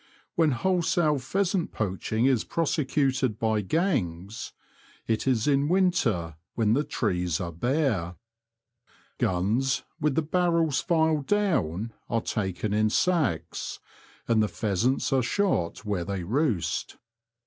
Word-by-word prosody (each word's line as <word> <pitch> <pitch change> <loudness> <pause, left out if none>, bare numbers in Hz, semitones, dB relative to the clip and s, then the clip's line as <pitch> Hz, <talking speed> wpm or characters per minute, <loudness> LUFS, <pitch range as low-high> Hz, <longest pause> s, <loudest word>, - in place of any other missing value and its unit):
When 160 -4 +3
wholesale 165 0 +1
pheasant 185 +6 -1
poaching 110 +3 -1
is 130 -4 +3
prosecuted 135 -6 0
by 110 -1 +1
gangs, 105 - -1 0.5
it 110 +3 -1
is 120 -3 +2
in 140 0 +2
winter, 120 - +1 0.2
when 110 -2 +2
the 145 +5 +2
trees 90 - -1
are 85 -3 -3
bare. 110 - 0 1.0
Guns, 115 +6 +1 0.2
with 150 -3 +1
the 160 - +2
barrels 165 -2 +1
filed 160 -4 +1
down, 115 - 0 0.2
are 115 - +1
taken 100 -1 -2
in 110 +1 +3
sacks^ 110 - 0 0.5
and 115 -2 +3
the 105 - +2
pheasants 110 +7 0
are 130 - +4
shot 125 - 0
where 100 -4 -1
they 100 -1 -3
roost. 110 - -1
125 Hz, 120 wpm, -27 LUFS, 100-155 Hz, 1.0 s, are